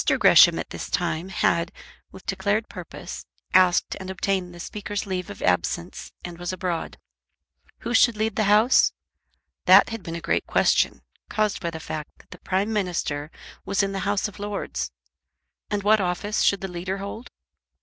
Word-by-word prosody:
Gresham -, -, +7 dB
at -, -, -5 dB
this -, -, -6 dB
time 165 Hz, +4 st, -1 dB
had, 170 Hz, -1 st, +1 dB, 0.4 s
with -, -, -13 dB
declared 215 Hz, +2 st, 0 dB
purpose, -, -, -8 dB, 0.3 s
asked 185 Hz, -1 st, +4 dB
and 190 Hz, -, -7 dB
obtained 190 Hz, -1 st, -1 dB
the 175 Hz, -, -12 dB
Speaker's 205 Hz, +2 st, -4 dB
leave 185 Hz, -2 st, -3 dB
of 100 Hz, -, -8 dB
absence 95 Hz, -, -1 dB
and 175 Hz, -1 st, -8 dB
was 175 Hz, 0 st, -3 dB
abroad. 180 Hz, -2 st, -3 dB, 0.8 s
Who 235 Hz, -, -3 dB
should 235 Hz, -1 st, +5 dB
lead 220 Hz, -1 st, -1 dB
the 215 Hz, -, +1 dB
House? 215 Hz, +5 st, +5 dB, 0.7 s
That -, -, +7 dB
had 225 Hz, -1 st, -5 dB
been 165 Hz, -1 st, -6 dB
a -, -, -3 dB
great 170 Hz, -, -1 dB
question, -, -, +2 dB, 0.3 s
caused 215 Hz, -2 st, 0 dB
by 170 Hz, -, -2 dB
the 160 Hz, -1 st, -7 dB
fact 155 Hz, -1 st, -6 dB
that -, -, -22 dB
the -, -, -11 dB
Prime 195 Hz, +4 st, -1 dB
Minister 170 Hz, -7 st, -2 dB, 0.3 s
was 200 Hz, 0 st, +1 dB
in 195 Hz, -, -1 dB
the 195 Hz, -, -3 dB
House 200 Hz, +1 st, 0 dB
of 205 Hz, -, -12 dB
Lords; 200 Hz, -, -3 dB, 0.8 s
and 205 Hz, -1 st, -1 dB
what 215 Hz, +1 st, +4 dB
office 190 Hz, +4 st, -1 dB
should 200 Hz, -, +3 dB
the 195 Hz, -, -3 dB
Leader 180 Hz, +2 st, -4 dB
hold? 200 Hz, +4 st, -7 dB
190 Hz, 170 wpm, -24 LUFS, 175-205 Hz, 0.8 s, Gresham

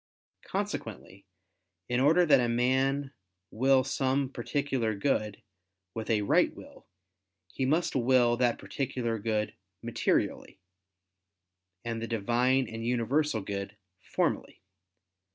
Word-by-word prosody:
Consequently, 95 Hz, +1 st, -5 dB, 0.6 s
in 120 Hz, 0 st, 0 dB
order 160 Hz, +7 st, +5 dB
that 140 Hz, -4 st, +6 dB
a 120 Hz, -1 st, +1 dB
man 135 Hz, +3 st, +1 dB, 0.4 s
will 130 Hz, +3 st, +3 dB
some 135 Hz, 0 st, 0 dB
particular 125 Hz, -3 st, -1 dB
good 105 Hz, -2 st, -1 dB, 0.5 s
with 110 Hz, -1 st, -5 dB
a 105 Hz, -2 st, +2 dB
right -, -, +3 dB
will, -, -, -14 dB, 0.7 s
he 130 Hz, -, -1 dB
must 160 Hz, +5 st, +1 dB
will 125 Hz, -1 st, +4 dB
that 120 Hz, -1 st, +1 dB
particular 125 Hz, -4 st, -3 dB
good 110 Hz, 0 st, -1 dB, 0.3 s
materially, -, -, -1 dB, 1.3 s
and 115 Hz, -1 st, -3 dB
the 115 Hz, -, -3 dB
Divine 120 Hz, +4 st, +1 dB
and 115 Hz, 0 st, -6 dB
universal 125 Hz, +2 st, 0 dB
good, 100 Hz, +1 st, -5 dB, 0.2 s
formally. -, -, -2 dB
120 Hz, 110 wpm, -29 LUFS, 115-135 Hz, 1.3 s, that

